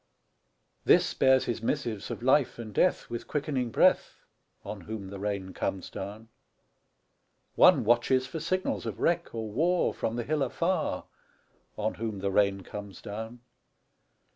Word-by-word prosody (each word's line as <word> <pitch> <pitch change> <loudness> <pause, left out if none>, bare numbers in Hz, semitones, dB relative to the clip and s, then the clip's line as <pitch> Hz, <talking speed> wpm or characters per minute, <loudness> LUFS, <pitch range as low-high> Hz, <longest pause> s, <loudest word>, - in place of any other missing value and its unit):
This - - +4
bears 130 0 +4
his 115 -2 -2
missives 115 -5 -2
of - - -5
life 130 +1 +3
and 110 -3 -7
death - - +2
With 120 0 -6
quickening 140 -4 -1
breath, - - +2 0.4
On 105 -1 -6
whom 100 +1 -6
the 100 - -7
rain 100 -2 -3
comes 95 - -3
down. 105 +4 -7 1.2
One - - +6
watches 120 +3 +3
for 130 +5 -5
signals 185 +4 -1
of - - -5
wreck 170 -6 0
or 110 -2 -4
war 170 +9 +2
From 115 - -2
the 120 - -2
hill 150 +4 -1
afar, 170 +8 -1 0.7
On 110 +1 -1
whom 110 -2 -4
the 100 0 -2
rain 100 -1 +2
comes 100 +1 -8
down. 110 +3 -7
115 Hz, 145 wpm, -29 LUFS, 105-130 Hz, 1.2 s, One